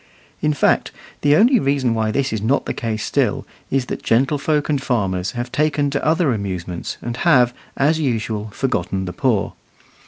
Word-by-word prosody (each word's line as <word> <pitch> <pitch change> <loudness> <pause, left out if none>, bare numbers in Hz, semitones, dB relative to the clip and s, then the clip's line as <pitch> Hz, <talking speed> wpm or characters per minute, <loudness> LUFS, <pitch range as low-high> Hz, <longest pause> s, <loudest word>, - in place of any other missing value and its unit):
In 150 - +2
fact, 145 - +2 0.3
the 145 0 +4
only 240 - +5
reason 135 - +1
why 110 -1 0
this 135 +2 0
is 110 - -2
not 125 +7 +1
the - - -2
case 110 -2 -3
still - - 0 0.2
is 135 -2 0
that - - -5
gentlefolk 145 +5 +1
and 145 -3 0
farmers 95 -8 -1
have 120 0 -4
taken 145 0 +1
to 140 - -2
other 155 -3 +2
amusements, 90 -4 -4
and 120 0 -4
have, 125 -7 +4 0.2
as 155 +4 +2
usual, 110 -6 -1
forgotten 100 -5 -2
the 90 - -5
poor. 120 -7 0
125 Hz, 175 wpm, -20 LUFS, 110-145 Hz, 0.3 s, only